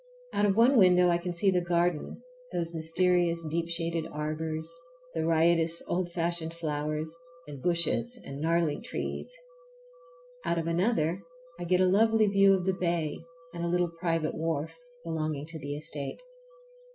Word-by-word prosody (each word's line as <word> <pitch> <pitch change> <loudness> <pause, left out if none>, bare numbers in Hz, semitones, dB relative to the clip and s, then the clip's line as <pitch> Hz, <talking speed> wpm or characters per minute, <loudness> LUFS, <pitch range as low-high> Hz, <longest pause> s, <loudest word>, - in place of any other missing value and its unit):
Out 205 - +3
of 195 - +2
one 245 +4 +5
window 180 -2 +6
I 170 0 +2
can 175 +1 -4
see 185 +3 +2
the 180 -1 +2
garden, 175 +4 -1 0.3
those 170 -1 -2
mysterious 170 +1 +2
deep 165 +2 -2
shaded 165 -1 -1
arbors, 155 +1 -3 0.5
the 160 - -1
riotous 165 0 +3
old 175 0 -1
fashioned 170 -1 -2
flowers, 155 0 -3 0.3
and 140 -3 -9
bushes 175 - -1
and 140 +1 -7
gnarly 165 -2 +1
trees. - - -5 1.1
Out 170 - 0
of 165 - -1
another 170 0 +1 0.4
I 175 - -4
get 180 +1 +3
a - - +5
lovely 220 +3 +4
view 195 -1 +5
of 180 -1 -2
the 190 - +2
bay 170 -4 -1 0.3
and 170 0 -4
a - - 0
little 175 -1 +1
private 165 -3 0
wharf 160 0 -2 0.3
belonging 155 -3 -3
to 160 0 -7
the 145 0 -4
estate. 150 -2 -4
170 Hz, 155 wpm, -29 LUFS, 160-180 Hz, 1.1 s, window